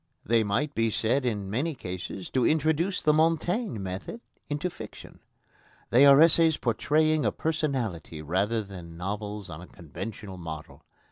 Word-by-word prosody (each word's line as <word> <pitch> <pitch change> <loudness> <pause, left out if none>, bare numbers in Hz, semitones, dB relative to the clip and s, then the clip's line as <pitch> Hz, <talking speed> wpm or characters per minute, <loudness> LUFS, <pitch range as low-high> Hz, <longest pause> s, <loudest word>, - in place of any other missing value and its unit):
They 115 +1 +3
might 125 +9 -1
be 115 0 +1
said 125 +5 0
in 105 -4 -2
many 135 +10 -1
cases 90 -2 -6
to 130 - +1
introduce 160 +6 +1
the 150 - +4
Montaigne 165 - +1
method 95 - -5 0.3
into 150 +4 -1
fiction. 180 - -10 0.7
They 130 +4 +7
are 140 0 +8
essays 165 -1 +6
portraying 155 +6 +2
a - - +2
personality 130 - -2
rather 100 +8 0
than 90 -4 -10
novels 105 +2 -4
on 80 +1 -8
a 90 - -11
conventional 95 +4 -8
model. 80 -2 -8
115 Hz, 145 wpm, -27 LUFS, 95-155 Hz, 0.7 s, are